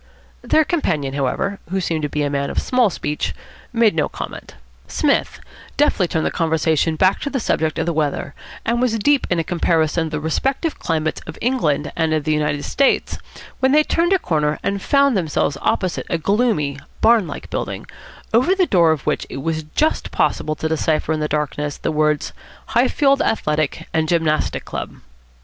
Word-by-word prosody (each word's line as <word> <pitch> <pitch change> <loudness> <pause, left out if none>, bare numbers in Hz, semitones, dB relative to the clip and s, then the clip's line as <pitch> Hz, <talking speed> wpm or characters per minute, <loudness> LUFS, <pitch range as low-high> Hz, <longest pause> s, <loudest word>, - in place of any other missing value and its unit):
Their 315 - +3
companion, 155 - -1
however, 145 +9 -1
who 190 +2 -1
seemed 165 -3 -1
to 150 - -2
be 150 0 -1
a 145 - 0
man 140 0 -1
of - - -6
small 250 -4 +3
speech, 150 -4 -3 0.4
made 230 -3 +3
no 155 -2 0
comment. - - -8 0.3
Psmith - - 0 0.4
deftly 250 -10 +3
turned 160 -1 -1
the - - 0
conversation 160 -1 +1
back 185 +4 +3
to 285 - -3
the 275 - -1
subject 160 -8 0
of - - 0
the 170 - 0
weather, 145 -2 -1 0.3
and 235 +1 +1
was 240 -3 +1
deep 280 +5 +2
in 175 - +1
a 165 - +1
comparison 165 -1 +1
of - - -8
the 150 - -2
respective 270 - -1
climates 155 -1 -1
of 160 - -8
England 165 - 0
and 160 -1 +1
the 155 - +2
United 150 -1 -1
States, 275 - +1 0.4
when 265 +1 +3
they 305 +1 +6
turned 340 +3 +1
a 385 - +5
corner 150 - 0
and 200 0 -1
found 280 +1 +3
themselves 160 -5 0
opposite 185 -2 -1
a 170 - +1
gloomy, 165 - +1 0.2
barn 225 -5 +5
like - - -8
building, - - -4 0.5
over 255 +12 +4
the 380 -2 +3
door 170 - +4
of 155 -3 -2
which - - -1
it 135 - -6
was 160 0 -1
just 310 +1 +1
possible 155 - 0
to 160 - -2
decipher 160 0 0
in 155 - -2
the 150 - 0
darkness 150 -1 -2
the - - -2
words 150 -1 0 0.4
"Highfield 275 -2 +3
Athletic 150 -8 -1
and 160 -1 +1
Gymnastic 160 -3 0
Club." - - -5
165 Hz, 185 wpm, -20 LUFS, 150-230 Hz, 0.5 s, they